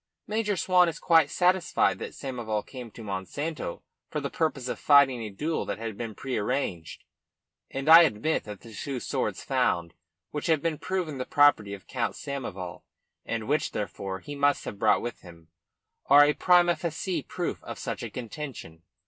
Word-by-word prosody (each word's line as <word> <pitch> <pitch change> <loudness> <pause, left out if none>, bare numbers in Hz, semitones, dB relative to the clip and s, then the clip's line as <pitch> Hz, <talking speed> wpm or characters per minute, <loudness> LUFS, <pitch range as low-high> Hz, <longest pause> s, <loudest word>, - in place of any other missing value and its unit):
"Major 210 -2 -1
Swan 180 -1 +4
is 165 - -6
quite 165 -4 +4
satisfied 180 +1 +2
that - - -6
Samoval 120 -6 -3
came 125 -3 -9
to 115 - -11
Monsanto 100 - -4 0.3
for - - -2
the - - -4
purpose 145 -6 -1
of - - -4
fighting 140 -4 +5
a 110 - -4
duel 155 +11 -2
that - - -3
had 115 -1 -5
been 115 -1 -6
prearranged; 110 - -3 0.7
and 135 +2 -5
I 165 +1 +11
admit 155 0 +1
that 105 -2 -8
the 115 - -12
two 130 +5 -4
swords - - -2
found, 85 -1 0 0.4
which 150 - -3
have 160 -3 +3
been 165 -3 -1
proven 175 -7 -3
the 130 - -2
property 110 -9 +4
of 95 - -15
Count 120 -3 -2
Samoval, 95 - -6 0.5
and 115 -2 -3
which, 150 +3 0
therefore, 95 -2 -4
he 145 - -7
must 145 0 +1
have 100 - -6
brought 110 - +3
with 120 -1 -5
him, 85 -3 -15 0.6
are 145 +1 +8
a 150 - +3
prima 175 0 +4
facie 170 0 -3
proof - - -4
of - - -7
such - - -4
a - - -4
contention. 120 - -7
135 Hz, 175 wpm, -27 LUFS, 105-160 Hz, 0.7 s, I